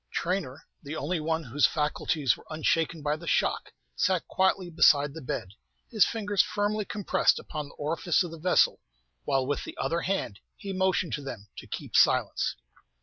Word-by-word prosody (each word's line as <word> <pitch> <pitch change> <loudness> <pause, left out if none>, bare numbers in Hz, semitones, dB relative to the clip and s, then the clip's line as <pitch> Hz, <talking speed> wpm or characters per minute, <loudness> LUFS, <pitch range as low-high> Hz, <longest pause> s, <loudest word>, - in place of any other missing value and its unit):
Traynor, 170 -7 -2 0.2
the 145 +3 -6
only 160 +4 -2
one 160 +1 -1
whose 140 +2 +3
faculties 150 -2 0
were - - -16
unshaken 160 0 0
by 150 0 +1
the 170 +2 -10
shock, - - 0 0.2
sat 185 -2 +1
quietly 190 -1 +1
beside 145 -3 +4
the 160 - -8
bed, 110 -6 -4 0.4
his 215 -6 +5
fingers 205 -3 +1
firmly 210 0 -1
compressed 205 -1 +1
upon 150 -3 -6
the - - -16
orifice 165 +4 0
of 175 - -6
the 165 - -9
vessel, 180 +3 +3 0.5
while 135 -1 +1
with 145 +2 -2
the - - -9
other 170 +1 -1
hand 175 - -2 0.2
he 195 -1 -6
motioned 185 -2 +1
to 150 - -2
them 115 -7 -8
to - - -10
keep - - -6
silence. - - +3
165 Hz, 175 wpm, -28 LUFS, 145-185 Hz, 0.5 s, his